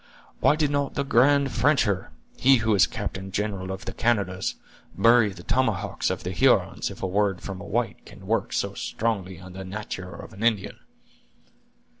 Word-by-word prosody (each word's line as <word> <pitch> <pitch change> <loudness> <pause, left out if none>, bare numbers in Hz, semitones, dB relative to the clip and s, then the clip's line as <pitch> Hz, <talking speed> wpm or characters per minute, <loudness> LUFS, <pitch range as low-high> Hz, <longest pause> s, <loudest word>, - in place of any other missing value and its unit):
"Why 150 - +4
did 150 -2 +1
not 145 -1 -1
the 140 - 0
grand 140 +1 +4
Frencher, 120 -10 +2 0.3
he 135 +1 +5
who 110 -2 +1
is 95 -2 +5
captain 95 -1 -5
general 100 -1 -2
of 95 0 -6
the - - -4
Canadas, 100 -5 0 0.4
bury 115 +2 +5
the 95 -3 -10
tomahawks 105 -6 0
of 95 - -3
the 90 - -3
Hurons, 90 - +2
if - - -10
a - - +2
word 95 0 +1
from 95 -2 -6
a - - -8
white - - -2
can - - -14
work - - 0
so - - -1
strongly 95 -6 -3
on 90 0 -11
the 95 +1 -7
natur' 95 -1 -6
of - - -10
an 95 - -11
Indian?" 110 -4 0
100 Hz, 180 wpm, -25 LUFS, 95-120 Hz, 0.4 s, he